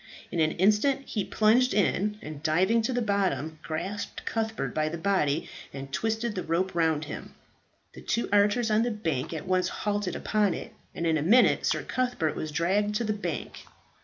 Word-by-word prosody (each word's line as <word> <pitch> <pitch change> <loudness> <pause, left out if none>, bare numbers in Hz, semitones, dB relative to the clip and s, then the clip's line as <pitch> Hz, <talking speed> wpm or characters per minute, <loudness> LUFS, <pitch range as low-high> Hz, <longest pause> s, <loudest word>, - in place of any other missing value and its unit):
In 170 - -2
an 155 0 +3
instant 210 +9 +3
he 210 - -2
plunged 225 +4 +3
in, 210 +1 +1
and 150 -1 -7
diving 185 +9 +3
to 225 - -1
the 245 -1 0
bottom, 190 -7 -1
grasped 190 +7 -5
Cuthbert 225 -1 -2
by 155 0 0
the 170 - -4
body, 165 -5 +1 0.2
and 135 0 -8
twisted 225 0 -1
the 185 - -3
rope 180 +3 -1
round 160 -3 +1
him. - - -8 0.6
The - - -11
two 235 - -1
archers 210 +3 +3
on 215 +1 +4
the 240 - +1
bank 160 - -2
at 160 -2 -5
once 185 0 +1
hauled 205 -1 -2
upon 210 -5 +1
it, - - -8 0.2
and 170 - -2
in 160 -1 +2
a - - -2
minute 225 - +4
Sir - - 0
Cuthbert 245 -11 -1
was 155 - -4
dragged 195 +6 +1
to 235 - 0
the 215 -1 0
bank. 180 -7 -5
200 Hz, 190 wpm, -28 LUFS, 160-215 Hz, 0.6 s, on